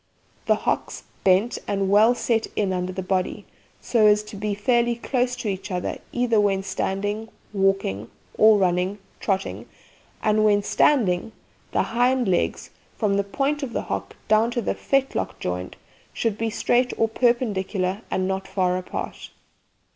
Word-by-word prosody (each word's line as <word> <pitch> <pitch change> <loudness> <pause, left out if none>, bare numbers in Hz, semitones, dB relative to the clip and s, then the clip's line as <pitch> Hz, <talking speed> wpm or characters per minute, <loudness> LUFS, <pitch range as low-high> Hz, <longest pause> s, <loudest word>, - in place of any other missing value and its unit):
The - - +5
hocks - - -2 0.2
bent 195 +5 +3
and 195 -1 0
well 215 +5 +5
set 230 -2 0
in 195 -3 0
under 180 0 -2
the 190 0 -5
body, 185 0 -1 0.4
so 220 -3 +3
as 210 0 +4
to 210 - -10
be 205 +1 -2
fairly 235 +2 +2
close 245 +1 -1
to 245 -3 -5
each 190 -1 -3
other 180 -2 -3
either 245 -3 +2
when 195 -2 +1
standing, 205 +3 -2 0.2
walking, 195 - 0 0.3
or 215 0 +6
running 185 +1 +1 0.2
(trotting); 195 -1 -2 0.5
and, 215 0 +3
when 205 -1 +4
standing, 215 -6 +2 0.4
the - - +2
hind 245 +1 +1
legs, 180 -2 0 0.3
from 210 -3 +1
the 200 - +2
point 275 +8 -1
of 260 -4 -4
the - - -2
hock - - -4
down 220 +2 +4
to 240 -1 -2
fetlock 275 -1 -1
joint, 90 0 -4 0.4
should 225 -3 -1
be 225 +1 -1
straight 245 +3 +1
or 225 - +3
perpendicular 210 -5 0
and 185 0 0
not 190 0 -2
far 185 -1 0
apart. 185 - -6
210 Hz, 155 wpm, -24 LUFS, 190-235 Hz, 0.5 s, or